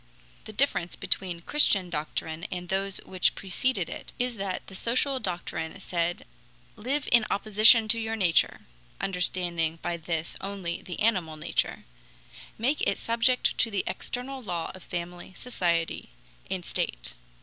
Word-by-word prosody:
The - - -7
difference 215 -7 0
between 185 -3 0
the 170 - -14
Christian 195 -11 +4
doctrine 160 +1 -3
and 180 -1 -5
those 195 0 0
which 185 -1 +2
preceded 195 0 0
it - - -8
is 245 -1 0
that 195 -2 -3
the - - -12
social 255 +7 0
doctrine 175 -3 -3
said: 175 -2 -2 0.5
"Live 270 +6 -2
in 235 -2 +7
opposition 215 +2 +6
to 230 - +3
your 225 0 -2
nature 180 -6 +2 0.4
[understanding 175 -3 0
by 175 -1 -1
this 165 0 -3
only 195 -3 -4
the 180 - -7
animal 185 -8 +1
nature], - - -2 0.7
make 260 +7 +1
it - - +2
subject 235 +2 +2
to 230 - +4
the 200 -3 0
external 260 +2 -4
law 175 -7 -3
of 185 - -12
family, 175 +1 -6
society, 170 -9 -1 0.4
and - - -3
state." - - -2
190 Hz, 145 wpm, -28 LUFS, 170-230 Hz, 0.7 s, in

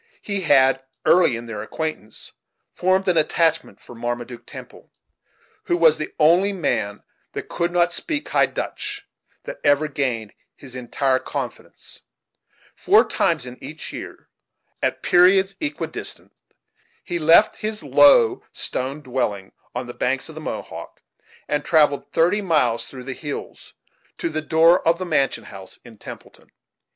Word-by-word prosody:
He 200 -2 -2
had, 135 -5 +4 0.2
early 175 -8 +5
in 115 +1 -7
their 110 -3 -6
acquaintance, 135 -2 -6 0.4
formed 185 +1 +1
an 180 -2 +3
attachment 160 - +1
for - - -14
Marmaduke 120 +1 -5
Temple, - - -11 0.8
who 175 - +1
was 160 -2 +4
the 155 - -4
only 175 +6 +4
man 110 - -2 0.3
that - - -6
could 170 0 -1
not 175 0 +2
speak 300 - -2
High - - +3
Dutch - - -5 0.4
that - - -8
ever 145 +2 +3
gained 125 -7 -2 0.2
his 130 -2 -11
entire 130 +1 0
confidence - - -7 0.7
Four - - +4
times 155 -6 +1
in 125 0 -11
each 155 +1 -7
year, - - -9 0.5
at - - -1
periods 190 +2 +4
equidistant, 300 -1 -5 0.7
he 175 -2 -3
left 165 +7 +5
his 215 0 -4
low 410 +6 +5
stone 135 +4 -2
dwelling 120 -8 -3 0.2
on 125 +1 -3
the 120 - -8
banks 135 +4 -1
of - - -9
the 155 - -9
Mohawk, - - -7 0.4
and 150 - -1
travelled 150 -3 +2
thirty 180 +6 +2
miles, 125 - +1
through 130 -2 -10
the 135 +1 -5
hills, 145 +2 -8 0.4
to - - -2
the 155 0 -3
door 165 +3 +4
of 165 +1 +4
the 185 - -4
mansion 135 -8 0
house 95 -2 -11
in 110 -3 -15
Templeton. - - -12
155 Hz, 145 wpm, -22 LUFS, 125-175 Hz, 0.8 s, early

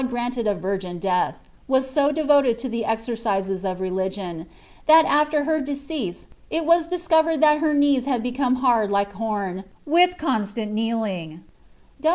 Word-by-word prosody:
gmnled 245 -2 -2
a 205 - 0
virgin 190 -2 -4
death, 180 0 0 0.3
was 265 0 +2
so 285 +2 +2
devoted 285 -5 +3
to 260 - -5
the 230 -2 -3
exercises 220 -4 -2
of 185 -1 -3
religion, 185 -2 -4 0.4
ihal 320 +1 +8
after 300 0 +2
her 315 +1 0
decease 280 - -5 0.2
it 325 0 -2
was 335 0 +3
discovered 330 -3 +1
thai 300 0 +5
her 305 -1 +1
knees 285 -3 +3
had 255 -5 -1
become 250 +1 0
hard 240 -5 +2
lOu 200 0 +2
horn 200 -3 -3 0.2
with 355 +4 +3
constant 220 - -2
kneeling." 210 -7 -3
240 Hz, 150 wpm, -23 LUFS, 200-290 Hz, 0.4 s, ihal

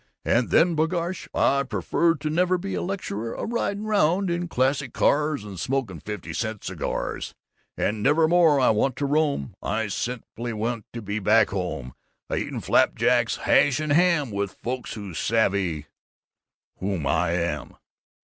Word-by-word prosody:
And 120 +1 +2
then 170 0 +4
b'gosh, 170 +3 -1
I 140 - +2
would 140 -2 -3
prefer 170 -1 +1
to 155 0 -4
never 180 +3 +2
be 195 +2 -5
a - - -1
lecturer, 115 - -4
a - - -4
ridin' 215 -3 -2
round 195 -3 +2
in 175 +1 -1
classy 135 -1 0
cars 150 0 +1
and 100 -4 -8
smoking 125 -5 -2
fifty 90 -1 -6
cent 110 +2 -3
cigars, - - -4 0.4
and 105 0 -1
never 155 +6 +4
more 165 -4 +5
I 130 - +4
want 115 +4 +1
to 140 - -2
roam; 145 - 0
I 110 +1 -1
simply 120 +1 -4
want 110 0 -3
to 115 -2 -6
be 105 +2 -2
back 110 +2 +4
home, 85 -10 -4 0.4
a - - 0
eatin' - - -3
flap - - +3
jacks, - - +2
hash, 140 -1 +3
and 155 -2 0
ham, 170 -6 +3
with 100 -1 -3
folks 125 0 -4
who 100 -4 -7
savvy 95 -6 0 0.9
whom 95 -5 -2
I 80 +5 +1
am! 85 -1 -2
125 Hz, 165 wpm, -25 LUFS, 100-160 Hz, 0.9 s, more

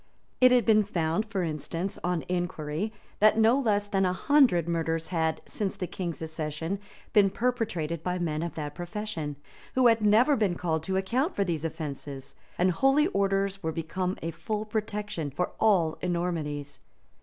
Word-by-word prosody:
It 255 0 +7
had 245 -4 +4
been 215 -1 +5
found, 175 0 0
for 200 -4 -1
instance, 165 +4 -4
on 175 -2 0
inquiry, 175 +1 -2 0.3
that 215 +1 +5
no 225 +4 +5
less 205 -5 +1
than 195 -1 +1
a 180 -1 +2
hundred 235 - +4
murders 165 -1 -1
had, 160 -3 0
since 200 -3 -3
the 185 - -3
king's 175 -2 -5
accession, 160 +3 -3 0.3
been 200 -2 +6
perpetrated 205 -9 -1
by 180 +1 -1
men 160 -3 -1
of 170 0 -4
that 150 -2 -4
profession, 175 -4 -4 0.4
who 255 -1 +4
had 230 -2 +5
never 220 +7 +5
been 205 -7 +1
called 160 -2 -1
to 190 +1 0
account 255 - 0
for 200 - +2
these 165 -5 -2
offences; 145 -4 -6 0.2
and 180 +1 +3
holy 270 - +4
orders 195 - 0
were 160 -3 -1
become 180 +3 -2
a 165 - -2
full 215 +5 -3
protection 210 -6 -3
for 175 +6 -2
all 185 -8 +3
enormities. 165 -5 -2
180 Hz, 165 wpm, -28 LUFS, 160-210 Hz, 0.4 s, It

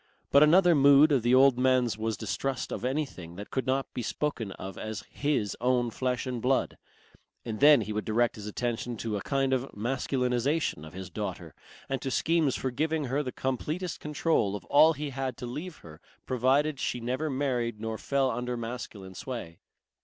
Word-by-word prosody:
But 140 - +7
another 175 +3 +6
mood 140 +1 +6
of 135 -4 +3
the 120 +2 +3
old 130 -1 +5
man's 125 -4 +3
was 110 -1 -2
distrust 125 +6 -3
of - - -4
anything 125 - -3
that 100 +3 -9
could 130 - -2
not 135 +1 -1
be - - -3
spoken 120 -4 -2
of 95 0 -8
as 110 -1 -5
his 140 -8 -1
"own 125 -1 +2
flesh 125 +1 -2
and 125 -2 -3
blood," 130 +2 0 0.7
and 110 -2 -4
then 145 -3 +7
he 105 0 -4
would 105 - -2
direct 115 +2 +1
his 105 -1 -8
attention 120 +2 -3
to 110 -1 -3
a 100 - -2
kind 135 +1 0
of 130 +1 -1
masculinization 125 - -1
of - - -13
his 95 -1 -8
daughter - - -5 0.3
and 135 -1 -2
to 135 - -2
schemes 160 0 +1
for 130 - -2
giving 155 +4 -1
her 145 - +2
the 130 -3 -4
completest 155 +9 -3
control 150 -9 0
of 105 - -7
all 155 +3 +6
he 150 -2 -5
had 130 -2 -3
to 125 - -6
leave 155 +8 -6
her 80 -2 -12 0.2
provided 135 +4 +1
she 120 - -2
never 130 +6 -2
married 125 -5 -1
nor 110 0 -4
fell 135 -2 +1
under 125 +1 -3
masculine 115 -5 -6
sway. 95 -6 -7
125 Hz, 190 wpm, -28 LUFS, 115-140 Hz, 0.7 s, But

